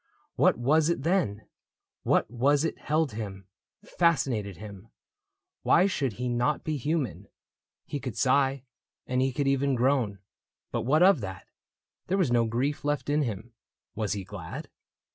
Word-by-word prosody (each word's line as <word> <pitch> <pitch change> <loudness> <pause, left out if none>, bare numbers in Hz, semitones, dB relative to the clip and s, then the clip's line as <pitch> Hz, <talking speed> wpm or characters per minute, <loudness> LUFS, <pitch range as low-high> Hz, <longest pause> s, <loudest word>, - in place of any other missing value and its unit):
What - - +4
was 150 +6 +3
it, 170 -5 -1
then? 155 - 0 0.6
What - - +2
was 140 +4 +2
it 165 - -3
held 155 -2 0
him 100 -3 -6 0.2
— - - -29
fascinated 125 - +1
him? 100 +1 -10 0.7
Why 180 - +4
should 140 - -1
he 125 +4 -4
not 120 +5 0
be 155 - -2
human? 145 - -2 0.6
He 145 - -4
could 125 -5 -6
sigh. 135 0 +2 0.4
And 125 0 0
he 135 0 +1
could 140 +2 -1
even 135 0 +2
groan, 125 -5 +1 0.3
— - - -62
but - - -1
what 155 +5 +4
of 185 -8 +5
that? 95 -3 -7 0.6
There 190 - +1
was 175 -10 +2
no 120 -1 +3
grief 130 +6 -1
left 145 0 -1
in 150 +1 +2
him. 115 -2 -4 0.4
Was 105 -2 -2
he 100 -2 -4
glad 95 -4 -8
130 Hz, 160 wpm, -28 LUFS, 110-145 Hz, 0.7 s, of